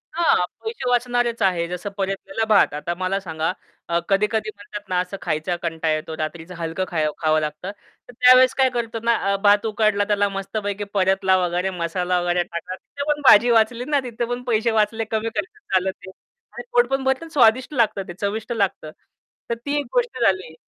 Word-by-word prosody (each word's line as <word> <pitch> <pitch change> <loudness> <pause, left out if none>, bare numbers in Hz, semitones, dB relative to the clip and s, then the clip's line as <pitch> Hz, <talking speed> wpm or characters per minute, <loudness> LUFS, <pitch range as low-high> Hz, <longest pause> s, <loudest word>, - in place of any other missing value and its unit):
हां, 335 - +3 0.2
पैसे 445 - -3
वाचणारेच 245 -1 0
आहे. 175 -3 +1
जसं 180 +3 -5
परतलेला 195 +5 -2
भात. 205 -8 +4
आता 160 +4 -3
मला 185 +2 -1
सांगा 160 -2 -2 0.4
अ, 170 - +2
कधी-कधी 210 +2 +1
म्हणतात 205 0 -9
ना 180 - +1
असं 180 +2 -4
खायचा 160 +4 -1
कंटाळा 165 -1 -1
येतो 155 +1 -4
रात्रीचं 165 +3 -5
हलकं 170 +3 -3
खं 155 -3 0
खावं 155 0 +3
लागतं. 155 +5 -4 0.4
तर - - -11
त्यावेळेस 255 +1 +6
काय 265 -1 +4
करतो 230 -1 -3
ना 235 0 +3 0.2
अ, - - +2
भात 205 +1 +5
उकडला 215 -1 +1
त्याला 205 -1 +2
मस्तपैकी 200 +1 -4
परतला 190 -1 +2
वगैरे 180 +1 0
मसाला 180 0 -1
वगैरे 175 0 +1
टाकला. 170 +1 -6
तिथे 280 +8 -8
पण 295 0 -2
भाजी 230 +2 +8
वाचली 230 +2 +2
ना, 290 -1 +1
तिथे 240 -1 -3
पण 245 +1 -4
पैसे 230 -1 +1
वाचले, 220 +2 0
कमी 220 +1 -1
खर्च 420 +1 -4
झाला 190 0 +2
ते 185 0 -14 0.4
आणि - - -7
पोट 480 0 +4
पण 270 0 0
भरतं 265 +4 0
आणि 325 - -13
स्वादिष्ट 255 +2 +3
लागतं 215 -6 0
ते, 175 - -7
चविष्ट 220 +3 -3
लागतं. 195 -8 -2 0.6
तर 235 - 0
ती 285 - -1
एक 285 - -4
गोष्ट 485 - 0
झाली. 185 -4 +1
205 Hz, 190 wpm, -22 LUFS, 180-235 Hz, 0.6 s, भाजी